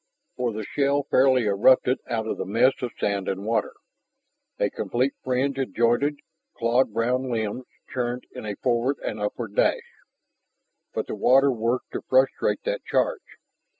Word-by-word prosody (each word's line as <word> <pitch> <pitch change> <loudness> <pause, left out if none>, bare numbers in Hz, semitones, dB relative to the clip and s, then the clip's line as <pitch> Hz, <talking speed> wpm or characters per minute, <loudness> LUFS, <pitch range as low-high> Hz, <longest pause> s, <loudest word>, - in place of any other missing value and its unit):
For 125 -2 -1
the 110 0 -5
shell 140 +5 0
fairly 130 -1 +4
erupted 120 +5 +4
out 110 -2 -1
of - - -3
the - - -1
mess 115 +6 +4
of 125 - -2
sand 100 -2 -1
and 95 +1 -3
water. 115 +1 0 0.8
A - - 0
complete 130 +3 -1
fringe 130 +2 0
of 135 - -3
jointed, 120 +5 +2 0.4
clawed 115 +1 +2
brown 125 +4 0
limbs 110 +2 -2 0.3
churned 125 -1 -2
in - - -8
a 105 - -3
forward 125 +4 0
and 105 - -3
upward 105 +1 -4
dash. - - +3 1.1
But - - -3
the - - -6
water 135 +2 +4
worked 120 +1 -2
to - - -4
frustrate 130 +1 +1
that - - -2
charge. 485 -5 0
125 Hz, 155 wpm, -25 LUFS, 110-130 Hz, 1.1 s, fairly